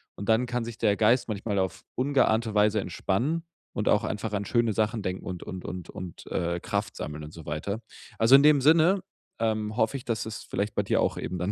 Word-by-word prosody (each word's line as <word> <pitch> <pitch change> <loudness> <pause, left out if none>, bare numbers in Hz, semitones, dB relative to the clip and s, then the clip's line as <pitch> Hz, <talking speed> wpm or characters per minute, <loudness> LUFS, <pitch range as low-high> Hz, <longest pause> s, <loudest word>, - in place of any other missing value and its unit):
und 100 - -6
dann 110 +3 +4
kann 120 -1 -2
sich 115 -1 -7
der 105 -3 +2
Geist 115 +3 +3
manchmal 105 0 -2
auf 95 -1 -2
ungeahnte 125 -5 +2
Weise 105 0 +3
entspannen 120 - -1 0.3
und 105 - 0
auch 105 - +4
einfach 105 +1 -3
an 100 0 -1
schöne 115 +2 +2
Sachen 110 +1 0
denken 95 -1 -4
und 90 -2 -5
und 95 -1 -7
und 90 -2 -6
und, 90 -2 -8
äh, 85 0 -1
Kraft - - -2
sammeln 75 0 -5
und 75 - -11
so 80 -3 -11
weiter. 90 +9 -3 0.4
Also, 115 +4 +7
in 140 - +7
dem 150 -2 +6
Sinne, 165 +6 +5 0.4
ähm, 110 -1 -1
hoffe 110 +3 +1
ich, 130 - -11
dass 115 -1 -2
es 110 -1 -6
vielleicht 105 +1 -3
bei - - +1
dir - - +1
auch - - 0
eben 90 - -4
dann 90 +3 -1
110 Hz, 225 wpm, -27 LUFS, 95-120 Hz, 0.4 s, Also